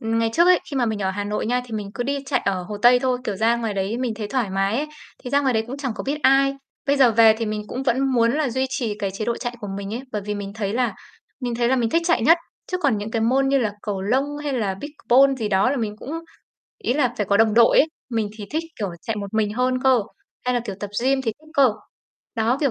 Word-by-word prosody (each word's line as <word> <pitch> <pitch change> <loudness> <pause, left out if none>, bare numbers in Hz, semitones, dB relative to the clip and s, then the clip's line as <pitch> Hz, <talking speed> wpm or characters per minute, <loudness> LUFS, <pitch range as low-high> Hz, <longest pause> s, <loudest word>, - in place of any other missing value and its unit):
ừm, 225 0 -1
ngày 225 0 +1
trước 340 +6 +4
ấy, 365 -1 +6
khi 280 - -3
mà 250 -2 +2
mình 220 -2 -1
ở 190 - +1
Hà 205 +2 -3
Nội 210 +1 -2
nha, 250 +1 +1
thì 240 - -12
mình 205 -2 -4
cứ 245 - -2
đi 280 +3 -1
chạy 260 -3 +1
ở 190 -2 0
Hồ 205 +4 -6
Tây 245 +1 +7
thôi, 255 0 0
kiểu, 205 -5 -2
ra 225 +3 +2
ngoài 225 -3 -3
đấy 200 +4 -2
mình 250 -3 -1
thấy 210 -1 -5
thoải 245 -6 -1
mái 195 +3 0
ấy, 300 - -1 0.3
thì 250 - -8
ra 280 - +3
ngoài 270 -2 +1
đấy 220 0 +1
cũng 255 +3 -6
chẳng 275 -4 -3
có - - -5
biết 290 +3 -2
ai. 275 +1 +4 0.3
Bây 280 0 +3
giờ 255 -4 +5
về 220 0 +6
thì 230 - -2
mình 210 0 -3
cũng 255 - -4
vẫn 260 -2 +1
muốn 235 -1 +3
là 300 0 0
duy 260 +2 0
trì 245 -5 -2
cái 200 -2 -2
chế 200 +3 -4
độ 235 +1 -1
chạy 240 -1 -5
của 205 - -5
mình 200 +1 -5
ấy, 240 - -3
bởi 210 - -2
vì 210 +1 -3
mình 200 -1 -5
thấy 205 -2 -2
là 245 +1 0 0.5
mình 245 -2 -2
thấy 235 0 +1
là 265 - +3
mình 235 -3 0
thích 335 - +2
chạy 340 -10 +2
nhất, 330 +8 +6 0.3
chứ 365 - -2
còn 280 - +1
những 210 +2 -5
cái 225 -1 -1
môn 265 +4 +2
như 275 0 +3
là 220 -5 0
cầu 200 -3 -3
lông 250 +8 +2 0.2
hay 290 - -1
là 210 -7 -1
pickleball 275 -2 +3
gì 220 -3 -1
đó 195 +5 +3
là 285 - 0
mình 215 -4 -3
cũng 250 - -9 0.7
ý - - 0
là 250 -4 +1
phải 205 - -1
có 200 - +3
đồng 220 0 +4
đội 235 0 +6
ấy, - - +6 0.2
mình 220 -3 -1
thì 210 - -7
thích, 315 +2 -1 0.2
kiểu, 205 - -1
chạy 225 - -3
một 200 -1 -5
mình 215 -1 +1
hơn 255 +1 0
cơ, 260 -3 +5 0.4
hay 250 - +1
là 245 - +1
kiểu 205 -4 -4
tập 205 - -5
gym 265 +1 +2
thì 225 -3 -1
thích 310 - -20
cơ. 270 -6 +5 0.6
Đó, 230 +3 +1
kiểu, 280 -3 +2
235 Hz, 295 wpm, -22 LUFS, 210-265 Hz, 0.7 s, Tây